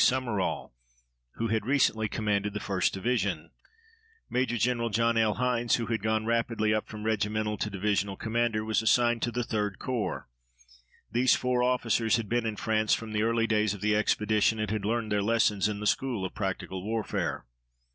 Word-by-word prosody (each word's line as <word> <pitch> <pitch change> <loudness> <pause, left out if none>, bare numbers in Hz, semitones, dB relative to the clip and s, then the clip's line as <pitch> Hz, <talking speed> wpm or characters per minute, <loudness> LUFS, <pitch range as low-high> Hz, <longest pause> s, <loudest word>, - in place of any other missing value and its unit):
Summerall, 120 - 0 0.6
who 115 0 -2
had 110 -1 0
recently 125 -5 +2
commanded 105 -1 -1
the - - -1
1st 95 -2 0
Division. 100 -6 -1 0.8
Major 125 -1 0
Gen. 115 0 0
John 115 +2 +2
L. 110 -2 +2
Hines, 120 -1 +1
who 115 - -2
had 115 -3 -2
gone 110 +1 0
rapidly 115 -2 +1
up 110 - -1
from 105 -1 -8
regimental 105 0 0
to 105 - -1
division 100 0 -1
commander, 110 -1 -1
was 110 0 +1
assigned 120 +1 +3
to 120 - 0
the 120 +1 -1
3d 105 -4 -2
Corps. 110 -9 -3 0.8
These 125 +2 +4
four 125 -1 0
officers 120 -3 +2
had 115 -2 -4
been 120 +1 0
in 110 - -2
France 110 0 +1
from 115 -1 -7
the 105 - +1
early 115 +1 +2
days 105 -2 +1
of 100 - -11
the 105 0 +2
expedition 110 +1 +2
and 110 -1 -2
had 105 -2 -2
learned 110 0 -1
their 105 -1 +2
lessons 105 -1 +2
in 105 -1 -4
the 105 - -5
school 120 -3 0
of 95 - -5
practical 95 -2 -4
warfare. 110 - -2
110 Hz, 180 wpm, -28 LUFS, 105-115 Hz, 0.8 s, These